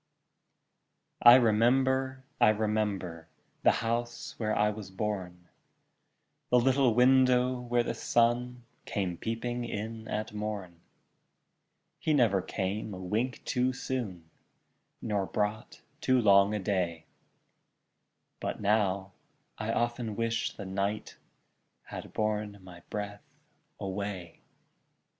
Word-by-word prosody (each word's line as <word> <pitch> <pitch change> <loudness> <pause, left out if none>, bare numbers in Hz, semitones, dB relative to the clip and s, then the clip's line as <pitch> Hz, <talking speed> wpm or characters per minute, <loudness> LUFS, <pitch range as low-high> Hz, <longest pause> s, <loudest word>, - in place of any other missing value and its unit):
I 120 +1 +10
remember, 130 +3 +3 0.2
I - - +6
remember, 105 -6 -1 0.3
The - - +5 0.2
house 120 +1 -2
where 110 -2 0
I 105 0 +3
was 105 -3 -8
born, 95 -3 -4 1.0
The 125 - +5
little 130 -1 +3
window 125 0 +4
where 120 -1 +1
the - - -2
sun 120 +1 +1 0.2
Came 95 -6 -2
peeping 120 +5 -3
in 110 0 -5
at 105 0 -3
morn; 105 -5 -5 1.2
He 155 - +1
never 110 -8 +3
came 100 +2 -3
a - - -8
wink 110 +7 -2
too 125 +1 +1
soon, 105 -11 -4 0.8
Nor 100 -4 -1
brought 105 +2 -3 0.2
too 130 -1 +3
long 100 -1 +5
a - - -1
day, 90 -5 -1 1.3
But - - -3
now, 100 -2 +1 0.5
I 110 +1 -1
often 120 -2 -1
wish 115 +1 -1
the 100 - -8
night 100 +2 -2 0.7
Had - - -8
borne 105 -1 -1
my 90 -2 -12
breath 105 -1 -5 0.6
away! 95 -3 -5
110 Hz, 110 wpm, -30 LUFS, 100-120 Hz, 1.3 s, I